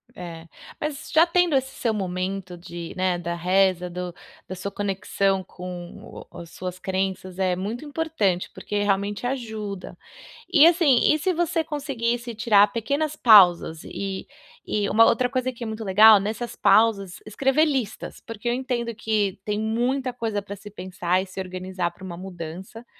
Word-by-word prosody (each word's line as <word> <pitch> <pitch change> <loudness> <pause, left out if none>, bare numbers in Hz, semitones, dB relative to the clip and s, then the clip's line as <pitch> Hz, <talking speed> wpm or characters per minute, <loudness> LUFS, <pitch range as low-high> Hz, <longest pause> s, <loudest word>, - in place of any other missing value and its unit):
É, 170 -2 -8 0.3
mas 300 0 -4
já 320 +2 +7
tendo 350 -3 +2
esse 265 0 0
seu 230 -3 -1
momento 185 -1 -3
de, 170 -1 -8
né, 185 -1 +1
da 170 0 -4
reza, 180 +1 +2
do 180 0 -5 0.3
da 185 - -7
sua 185 +2 -5
conexão 195 -1 -1
com 180 -1 -9
o - - -12
as 170 - -11
suas 180 -1 -6
crenças 190 -1 -3
é 185 -2 +1
muito 215 +9 -5
importante, 290 - -1
porque 205 0 -3
realmente 200 +2 -1
ajuda. 220 -6 -5 0.5
E 315 - +8
assim, 325 -8 +4
e 310 - +1
se 370 +5 +1
você 335 -1 0
conseguisse 240 -6 -3
tirar 210 -2 +5
pequenas 285 +6 -1
pausas 180 - +6
e 195 -1 -5 0.4
e 205 -1 0
uma 225 +2 +6
outra 250 +1 +3
coisa 255 +1 -1
que 240 -1 -9
é 230 - -4
muito 220 0 -5
legal, 210 +2 +7
nessas 220 +4 -4
pausas, 200 -5 +3
escrever 270 +8 +2
listas, 265 -8 -3
porque 230 +1 -7
eu 240 - +2
entendo 245 -2 -2
que 210 -3 -1
tem 210 0 -1
muita 245 +4 -1
coisa 225 -4 -2
para 200 0 -8
se 205 +1 -11
pensar 185 -2 -1
e - - -5
se 185 0 -9
organizar 185 -1 -3
para 175 - -16
uma 180 -2 -6
mudança, 185 +4 -8
205 Hz, 165 wpm, -24 LUFS, 185-245 Hz, 0.5 s, E